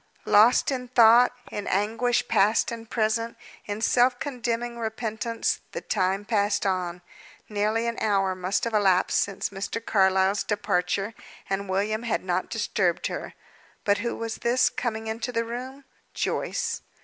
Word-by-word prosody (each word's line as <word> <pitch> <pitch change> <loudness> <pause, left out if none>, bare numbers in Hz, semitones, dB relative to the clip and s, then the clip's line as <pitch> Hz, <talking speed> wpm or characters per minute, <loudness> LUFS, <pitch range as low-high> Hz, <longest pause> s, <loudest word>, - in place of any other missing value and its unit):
Lost 225 +6 +5
in 250 -2 -3
thought, 240 0 +6 0.2
in 205 - -5
anguish 225 +5 +1
past 210 +4 +3
and 230 -1 -8
present, 230 +1 0 0.3
in 205 +1 -4
self 245 +2 +3
condemning 240 -4 -3
repentance, 225 0 -2
the - - -4
time 195 0 0
passed 205 -2 +1
on. 180 -2 -2 0.4
Nearly 215 +2 0
an 235 0 -2
hour 195 -3 +2
must 185 +1 -1
have 230 - -2
elapsed 190 -3 +3
since 200 -1 -1
Mr. 200 +3 -4
Carlyle's 190 -2 +2
departure, 195 0 -1 0.3
and 195 0 -2
William 205 +3 0
had 235 -1 -1
not 185 0 -1
disturbed 195 -5 0
her. - - -6 0.5
But 205 -1 +2
who 235 +2 -2
was 230 -1 -4
this, 245 +2 +2
coming 225 -2 -3
into 225 +3 -3
the 230 -1 -1
room? 260 +4 -7 0.3
Joyce. 460 -2 -2
220 Hz, 145 wpm, -26 LUFS, 200-235 Hz, 0.5 s, thought